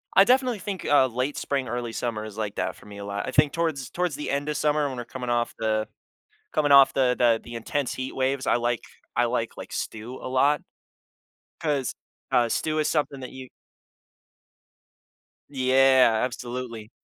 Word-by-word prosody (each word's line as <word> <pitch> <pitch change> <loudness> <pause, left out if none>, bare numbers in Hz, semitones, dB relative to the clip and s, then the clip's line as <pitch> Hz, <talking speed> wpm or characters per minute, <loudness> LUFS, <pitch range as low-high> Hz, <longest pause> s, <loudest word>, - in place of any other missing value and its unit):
I 195 - +9
definitely 250 -3 +3
think, 195 -1 -5
uh, 145 -3 +5
late 130 +4 -2
spring, 135 -2 -1
early 120 0 -3
summer 115 -2 -3
is 110 0 -9
like 105 -2 -3
that - - -2
for - - -17
me 105 -1 -10
a 100 - -6
lot. 100 0 -4
I - - -2
think 145 +2 +4
towards 155 -6 -2
towards 175 -5 -1
the 150 - -5
end 140 +1 -1
of 150 - -1
summer 150 -1 +2
when 130 - -5
we're 120 - -5
coming 125 -2 -6
off 120 -1 0
the 110 -1 0 0.6
coming 145 -2 +1
off 140 -1 +8
the 125 -2 +2
the 115 -2 +4
the 120 0 -9
intense 130 +4 -2
heat 130 0 -5
waves, 135 0 0
I - - +4
like 120 -1 0 0.3
I 120 - +3
like, 115 -1 -1
like, - - -9
stew 115 +4 -5
a - - -5
lot 140 +3 +3 1.0
'cause, 145 -5 -1 0.4
uh, 120 -1 +4
stew 155 +5 0
is 150 - +1
something 145 -3 -1
that 130 - -7
you 130 -1 -10 2.0
Yeah, 130 -3 +4
absolutely. 120 -3 -6
130 Hz, 185 wpm, -26 LUFS, 120-145 Hz, 2.0 s, I